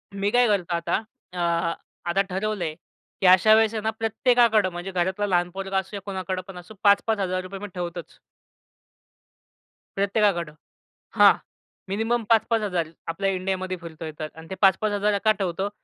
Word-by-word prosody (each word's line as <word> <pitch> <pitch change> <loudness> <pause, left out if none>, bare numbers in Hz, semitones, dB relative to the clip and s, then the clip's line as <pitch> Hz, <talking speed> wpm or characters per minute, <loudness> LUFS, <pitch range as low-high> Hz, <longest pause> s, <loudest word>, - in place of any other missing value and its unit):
मी 200 +1 0
काय 245 0 +4
करतो 185 -4 0
आता. 170 0 -1 0.4
अ, - - -8 0.7
आता 195 +3 +3
ठरवलंय 190 -4 -2 0.5
की - - +1
अशा 185 +4 +7
वेळेस 220 0 +3
ना 220 - +1
प्रत्येकाकडे 225 -2 +3
म्हणजे 175 +2 -6
घरातला 185 +3 0
लहान 175 -2 +1
पोरगा 195 +1 -3
असो 190 +2 -3
या 200 - -5
कोणाकडे 190 -1 -3
पण 195 - -9
असो, 180 +4 -11
₹5,000-5,000 195 -2 +1
मी 205 - -6
ठेवतोच. 175 -1 -6 1.8
प्रत्येकाकडं 195 -5 +1 0.7
हां, - - +9 0.6
मिनिमम 225 +4 0
5,000-5,000. 210 -7 +2 0.2
आपल्या 195 +4 -1
इंडियामध्ये 185 0 -2
फिरतोय 160 -1 -7
तर 155 - -3
अन 160 0 -12
ते 190 - -4
5,000-5,000 205 +1 +3
का 215 - +6
ठेवतो? 190 +1 -1
195 Hz, 140 wpm, -24 LUFS, 180-210 Hz, 1.8 s, हां